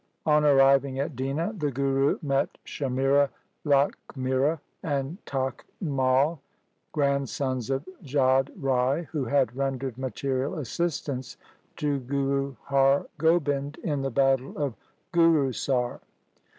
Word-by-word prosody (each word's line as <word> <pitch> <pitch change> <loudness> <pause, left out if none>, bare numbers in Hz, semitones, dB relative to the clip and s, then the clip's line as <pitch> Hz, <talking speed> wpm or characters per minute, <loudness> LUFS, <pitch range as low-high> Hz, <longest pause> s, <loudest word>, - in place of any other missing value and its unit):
On 150 -1 +4
arriving 135 -1 +5
at 140 +1 -2
Dina, 140 - -2
the 150 -7 -1
Guru 135 +1 +1
met 140 -1 0
Shamira, 135 +1 +1 0.3
Lakhmira, 140 0 +1 0.2
and 145 +3 -3
Takht 130 -1 -3
Mai, 140 -1 +2 0.5
grandsons 140 -4 -1
of 135 +3 -1 0.2
Jodh 135 -1 +2
Rai, 135 0 +1
who 145 -5 -1
had 130 -2 +1
rendered 135 -2 -2
material 135 +3 -2
assistance 145 -2 -3 0.4
to 145 -2 0
Guru 140 +1 -1
Har 140 0 +3
Gobind 145 -3 +1
in 145 -4 -1
the 135 - -1
battle 135 +1 +1
of 145 -4 -1 0.4
Gurusar. 140 -7 +2
140 Hz, 110 wpm, -27 LUFS, 130-145 Hz, 0.5 s, arriving